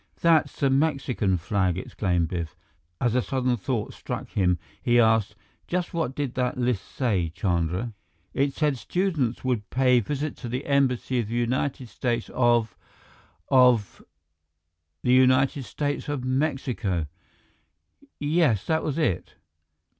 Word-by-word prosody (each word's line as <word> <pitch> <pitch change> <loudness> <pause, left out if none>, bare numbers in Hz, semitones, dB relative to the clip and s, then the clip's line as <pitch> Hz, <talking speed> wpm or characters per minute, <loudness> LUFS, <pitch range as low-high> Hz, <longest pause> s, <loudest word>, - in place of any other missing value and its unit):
"That's 165 -3 +3
the 135 -1 +2
Mexican 135 - +1
flag," 95 0 0
exclaimed 90 -3 -1
Biff. 85 -3 -4 0.4
As 120 -2 +1
a 125 - +3
sudden 130 -1 0
thought 115 0 -3
struck - - -6
him, 90 -3 +1 0.2
he 120 0 +3
asked, 110 -3 +3 0.3
"Just 180 0 -2
what 160 -6 -2
did 140 -4 -2
that 125 -1 -1
list 125 -5 0
say, 100 -10 0
Chandra?" 90 +4 -1 0.4
"It 140 0 0
said 150 -5 0
students 160 - -1
would 125 -5 -1
pay 125 -1 +4
visit 145 +6 -3
to 120 - -7
the 125 +4 -3
embassy 130 -2 +1
of 115 - -2
the 115 - -4
United 125 +2 -1
States 120 0 -2
of 120 -4 +2 0.7
of 125 -6 +4 0.5
" 80 0 -54
"The 125 - +3
United 130 +1 +4
States 145 +7 -3
of 145 -3 -2
Mexico!" 130 - -1 1.1
"Yes, 145 - +2
that 160 0 +1
was 150 -1 -2
it." 150 - -1
125 Hz, 140 wpm, -25 LUFS, 105-135 Hz, 1.1 s, pay